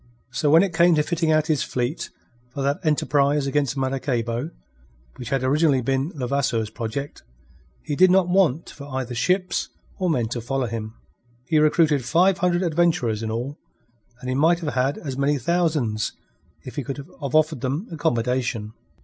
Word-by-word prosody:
So 150 Hz, -, 0 dB
when 160 Hz, +4 st, +7 dB
it 195 Hz, -3 st, -2 dB
came 170 Hz, +1 st, +5 dB
to 150 Hz, -, +2 dB
fitting 165 Hz, 0 st, -1 dB
out 155 Hz, -1 st, +3 dB
his 155 Hz, -4 st, +1 dB
fleet 125 Hz, +6 st, -2 dB, 0.4 s
for 135 Hz, +2 st, -5 dB
that 140 Hz, +1 st, 0 dB
enterprise 145 Hz, -2 st, +2 dB
against 140 Hz, -1 st, 0 dB
Maracaybo, 130 Hz, -1 st, -1 dB, 0.7 s
which 120 Hz, -2 st, -7 dB
had 135 Hz, -1 st, 0 dB
originally 140 Hz, -1 st, +2 dB
been 135 Hz, +5 st, 0 dB
Levasseur's 125 Hz, -5 st, -1 dB
project, 115 Hz, +6 st, -5 dB, 0.6 s
he 150 Hz, -, -3 dB
did 185 Hz, +4 st, +6 dB
not 185 Hz, -1 st, +4 dB
want 175 Hz, -5 st, +2 dB
for 140 Hz, -1 st, -10 dB
either 130 Hz, -2 st, -4 dB
ships 185 Hz, +10 st, 0 dB, 0.3 s
or 185 Hz, -1 st, +1 dB
men 125 Hz, -8 st, +1 dB
to 120 Hz, 0 st, -3 dB
follow 130 Hz, +2 st, -1 dB
him. 110 Hz, -1 st, -5 dB, 0.5 s
He 155 Hz, +3 st, +2 dB
recruited 150 Hz, -2 st, +3 dB
five 180 Hz, +9 st, +3 dB
hundred 180 Hz, 0 st, +1 dB
adventurers 155 Hz, -10 st, +1 dB
in 110 Hz, -, -3 dB
all, 120 Hz, +6 st, -4 dB, 0.6 s
and 125 Hz, -, -8 dB
he 130 Hz, -, 0 dB
might 165 Hz, +6 st, +3 dB
have 150 Hz, -3 st, -3 dB
had 130 Hz, +2 st, 0 dB
as 135 Hz, -3 st, -6 dB
many 145 Hz, +1 st, +2 dB
thousands 145 Hz, -7 st, 0 dB, 0.5 s
if 125 Hz, -, -9 dB
he 145 Hz, -, -1 dB
could 135 Hz, +2 st, -5 dB
have 140 Hz, -, -10 dB, 0.2 s
offered 155 Hz, -4 st, +2 dB
them 140 Hz, -, -2 dB
accommodation. 120 Hz, -6 st, -1 dB
140 Hz, 170 wpm, -23 LUFS, 125-160 Hz, 0.7 s, when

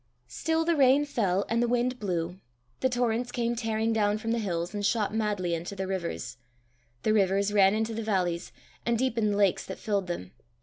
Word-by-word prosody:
Still 320 Hz, -, 0 dB
the 340 Hz, 0 st, +2 dB
rain 275 Hz, 0 st, +5 dB
fell 200 Hz, -8 st, 0 dB
and 230 Hz, +1 st, +1 dB
the 240 Hz, -, +2 dB
wind 245 Hz, +1 st, 0 dB
blew; 180 Hz, -3 st, -2 dB, 0.4 s
the 260 Hz, -, +2 dB
torrents 245 Hz, 0 st, 0 dB
came 240 Hz, -1 st, -1 dB
tearing 225 Hz, -1 st, 0 dB
down 210 Hz, -1 st, +2 dB
from 225 Hz, +1 st, -3 dB
the 235 Hz, -, +1 dB
hills, 175 Hz, -3 st, -2 dB
and 205 Hz, -1 st, -3 dB
shot 210 Hz, 0 st, +1 dB
madly 205 Hz, -5 st, 0 dB
into 170 Hz, +4 st, -4 dB
the 190 Hz, 0 st, -3 dB
rivers; 170 Hz, -10 st, -4 dB, 0.7 s
the 215 Hz, -, +3 dB
rivers 200 Hz, 0 st, +2 dB
ran 195 Hz, 0 st, +5 dB
into 220 Hz, +1 st, -1 dB
the 225 Hz, -, -3 dB
valleys, 180 Hz, -5 st, -1 dB, 0.3 s
and 235 Hz, 0 st, +1 dB
deepened 230 Hz, -4 st, +1 dB
the -, -, -1 dB
lakes 200 Hz, -3 st, +3 dB
that 190 Hz, -, -7 dB
filled 200 Hz, -4 st, -1 dB
them. 90 Hz, -, -5 dB
210 Hz, 200 wpm, -28 LUFS, 190-235 Hz, 0.7 s, rain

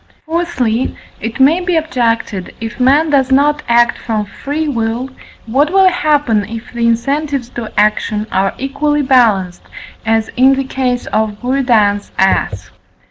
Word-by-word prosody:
Fourthly, 310 Hz, -8 st, -1 dB, 0.2 s
it 225 Hz, +3 st, -5 dB
may 290 Hz, +6 st, +4 dB
be 355 Hz, -1 st, -1 dB
objected, 230 Hz, -, -1 dB
if 225 Hz, +2 st, -6 dB
man 285 Hz, +5 st, +3 dB
does 270 Hz, -2 st, +2 dB
not 295 Hz, +2 st, +3 dB
act 235 Hz, 0 st, +3 dB
from 215 Hz, -3 st, -2 dB
free 290 Hz, +9 st, -4 dB
will, 235 Hz, 0 st, -2 dB, 0.3 s
what 275 Hz, +7 st, +1 dB
will 385 Hz, 0 st, +5 dB
happen 295 Hz, -, +1 dB
if 230 Hz, +2 st, -8 dB
the 235 Hz, -1 st, 0 dB
incentives 275 Hz, +2 st, -1 dB
to 235 Hz, -3 st, -7 dB
action 210 Hz, 0 st, +1 dB
are 195 Hz, +1 st, 0 dB
equally 290 Hz, +2 st, -1 dB
balanced, 220 Hz, -9 st, +2 dB, 0.4 s
as 225 Hz, 0 st, 0 dB
in 265 Hz, +2 st, +5 dB
the 270 Hz, -, -1 dB
case 255 Hz, -2 st, -2 dB
of 215 Hz, -1 st, -2 dB
Buridan's 240 Hz, -6 st, +1 dB
ass? 105 Hz, -, 0 dB
250 Hz, 140 wpm, -15 LUFS, 225-285 Hz, 0.4 s, will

